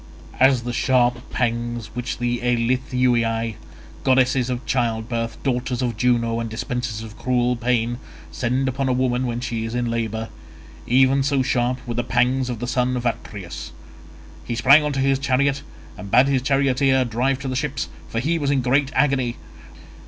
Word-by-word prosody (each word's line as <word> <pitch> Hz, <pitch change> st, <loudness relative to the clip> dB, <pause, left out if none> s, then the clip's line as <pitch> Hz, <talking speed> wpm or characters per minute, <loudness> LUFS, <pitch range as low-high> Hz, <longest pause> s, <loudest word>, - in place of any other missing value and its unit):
As 130 Hz, -2 st, +4 dB
the 120 Hz, 0 st, -4 dB
sharp 125 Hz, 0 st, +2 dB
pangs 120 Hz, -2 st, -2 dB
which 125 Hz, +1 st, -4 dB
the 120 Hz, 0 st, -1 dB
Eilithuiae, 120 Hz, -1 st, +1 dB, 0.5 s
goddesses 130 Hz, -1 st, +3 dB
of 125 Hz, 0 st, -3 dB
childbirth, 115 Hz, -1 st, -1 dB
daughters 125 Hz, -1 st, -1 dB
of 120 Hz, -3 st, -1 dB
Juno 115 Hz, -1 st, +1 dB
and 115 Hz, -1 st, -3 dB
dispensers 115 Hz, 0 st, -4 dB
of 110 Hz, -1 st, -10 dB
cruel 125 Hz, -1 st, +1 dB
pain, 120 Hz, 0 st, 0 dB, 0.3 s
send 125 Hz, +8 st, -1 dB
upon 130 Hz, +1 st, -1 dB
a -, -, +2 dB
woman 125 Hz, 0 st, 0 dB
when 120 Hz, 0 st, -2 dB
she 115 Hz, -2 st, -3 dB
is 115 Hz, +1 st, -4 dB
in 120 Hz, -1 st, -1 dB
labour—even 115 Hz, +4 st, -1 dB
so 140 Hz, -1 st, +1 dB
sharp 125 Hz, 0 st, 0 dB
were 120 Hz, -, -3 dB
the 120 Hz, +1 st, -1 dB
pangs 125 Hz, +2 st, +1 dB
of 120 Hz, -, -3 dB
the 120 Hz, -, -4 dB
son 125 Hz, 0 st, 0 dB
of 125 Hz, -, -4 dB
Atreus. 100 Hz, -6 st, -5 dB, 0.7 s
He 120 Hz, -, -4 dB
sprang 140 Hz, +6 st, +6 dB
on 150 Hz, -, -1 dB
to 135 Hz, -, -2 dB
his 135 Hz, 0 st, +2 dB
chariot, 140 Hz, +1 st, +1 dB, 0.3 s
and 100 Hz, +2 st, -9 dB
bade 125 Hz, +6 st, +6 dB
his 135 Hz, -2 st, +1 dB
charioteer 135 Hz, -1 st, +2 dB
drive 125 Hz, +3 st, 0 dB
to -, -, -4 dB
the 130 Hz, -, -2 dB
ships, 140 Hz, 0 st, -2 dB, 0.2 s
for 115 Hz, -, -2 dB
he 165 Hz, +7 st, 0 dB
was 145 Hz, -2 st, -1 dB
in 135 Hz, -3 st, +1 dB
great 135 Hz, +2 st, +2 dB
agony. 130 Hz, -5 st, +2 dB
125 Hz, 170 wpm, -22 LUFS, 120-130 Hz, 0.7 s, sprang